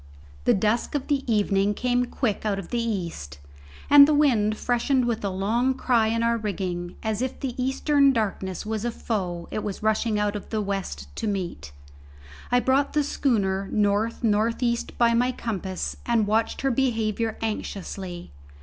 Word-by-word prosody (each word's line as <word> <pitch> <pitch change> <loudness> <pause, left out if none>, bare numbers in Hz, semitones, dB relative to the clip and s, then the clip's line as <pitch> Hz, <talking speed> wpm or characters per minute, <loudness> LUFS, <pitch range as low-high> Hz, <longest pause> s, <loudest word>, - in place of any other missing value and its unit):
The - - +5
dusk 215 +7 0
of 280 - -1
the 280 -2 +1
evening 205 -1 +2
came 245 +1 +1
quick 225 -7 -2
out 210 -2 0
of 195 -3 -7
the 240 - -1
east, 170 - -4 0.5
and 285 0 +9
the 305 - +3
wind 225 -8 +3
freshened 245 +1 +1
with 235 -3 -1
a 200 - 0
long 225 +8 0
cry 235 -4 +2
in 230 +1 0
our 235 0 +2
rigging 180 -4 -3
as 220 0 -1
if 260 0 -3
the 265 -3 -3
eastern 275 +1 +3
darkness 195 -6 -2
was 220 0 -3
a 240 - 0
foe 185 -7 -3
it 215 - -3
was 205 0 -5
rushing 220 0 +1
out 210 0 0
of 205 - -7
the 220 - -1
west 190 - -4
to - - -2
meet. 175 - -4 0.8
I 245 - +5
brought 265 +3 +1
the 300 - +2
schooner 200 -9 0
north 210 +3 +1
north 225 +2 +1
east 235 -1 -1
by 235 -1 +4
my 245 +2 +2
compass 195 -6 -4
and 230 -3 +2
watched 220 +2 0
her 270 - +1
behaviour 225 -3 0
anxiously. 190 - -5
220 Hz, 175 wpm, -25 LUFS, 200-245 Hz, 0.8 s, and